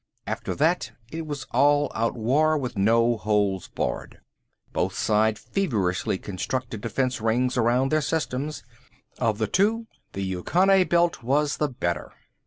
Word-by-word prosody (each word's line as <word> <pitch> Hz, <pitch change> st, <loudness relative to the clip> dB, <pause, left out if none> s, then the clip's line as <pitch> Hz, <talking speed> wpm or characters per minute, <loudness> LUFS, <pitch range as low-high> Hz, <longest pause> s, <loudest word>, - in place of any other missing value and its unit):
After -, -, -3 dB
that 165 Hz, +5 st, +1 dB, 0.2 s
it 160 Hz, 0 st, -5 dB
was 145 Hz, -2 st, -5 dB
all 145 Hz, +3 st, +3 dB
out 115 Hz, +1 st, 0 dB
war, 145 Hz, +7 st, +2 dB
with 125 Hz, -4 st, -4 dB
no 115 Hz, +3 st, +3 dB
holds 105 Hz, -3 st, 0 dB
barred. -, -, -4 dB, 0.5 s
Both -, -, -1 dB
sides 110 Hz, 0 st, +2 dB
feverishly 100 Hz, -, -1 dB
constructed 115 Hz, +4 st, -4 dB
defense 125 Hz, +2 st, -1 dB
rings 125 Hz, +3 st, +1 dB
around 125 Hz, +2 st, +2 dB
their 155 Hz, 0 st, +3 dB
systems. 150 Hz, -1 st, -2 dB, 0.6 s
Of 110 Hz, -2 st, +1 dB
the 110 Hz, -, 0 dB
two, 215 Hz, -, +1 dB, 0.3 s
the 100 Hz, -, -3 dB
Yucconae 180 Hz, -, +3 dB
belt 170 Hz, -3 st, +2 dB
was 145 Hz, +5 st, +1 dB
the 150 Hz, -, 0 dB
better. 85 Hz, -10 st, -3 dB
125 Hz, 140 wpm, -25 LUFS, 110-150 Hz, 0.6 s, all